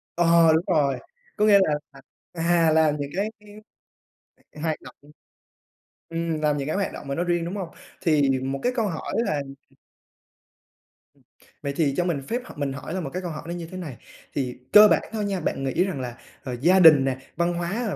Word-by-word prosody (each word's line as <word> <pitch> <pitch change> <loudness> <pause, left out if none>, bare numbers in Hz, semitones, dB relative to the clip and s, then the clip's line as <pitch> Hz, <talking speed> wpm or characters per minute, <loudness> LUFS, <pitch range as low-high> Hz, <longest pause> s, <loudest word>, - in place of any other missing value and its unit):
Ờ, 165 -1 +5
đúng 160 +3 +1
rồi, 145 -6 +2 0.4
có 210 - +2
nghĩa 200 -2 +7
là, 155 - +1 0.2
à, 135 -1 -15 0.3
à, 165 -1 +2
làm 155 -1 +3
những 140 0 -3
cái 205 +3 0 1.3
hoạt 160 -1 0
động - - -13 1.1
ừm, 165 -2 -2
làm 150 -1 +1
những 140 0 -3
cái 155 - -1
hoạt 200 0 -1
động 140 - -9
mà 140 - -2
nó 175 - 0
riêng, 175 -1 0
đúng 180 +4 -4
hông? 185 -4 -4 0.3
Thì 145 -5 +2
một 135 +1 -3
cái 245 - +2
câu 225 -3 +1
hỏi 165 -4 -5
là 155 -11 0 2.2
Ừm, - - -55
vậy 140 0 -2
thì 145 -4 +1
cho 175 - +1
mình 155 -6 -1
phép 240 +2 -2
h - - -10
mình 140 -2 -2
hỏi 140 +4 -7
là 185 - -2
một 140 - -4
cái 185 - -3
câu 175 -2 -5
hỏi 165 +2 -6
như 170 -1 -6
thế 185 - -9
này. 150 -10 -7 0.4
Thì 125 -3 -3 0.2
cơ 210 0 +10
bản - - +3
thôi 215 -1 -2
nha, 195 -2 -2
bạn 135 -4 -2
nghĩ 135 +7 +1
rằng 180 -9 -3
là, 120 -1 -6 0.3
ờ, 125 -1 -4
gia 185 +4 +5
đình 155 -6 +8
nè, 130 -1 -1 0.2
văn 170 0 +1
hóa, 175 0 -3 0.2
à, - - -3
165 Hz, 210 wpm, -24 LUFS, 140-180 Hz, 2.2 s, cơ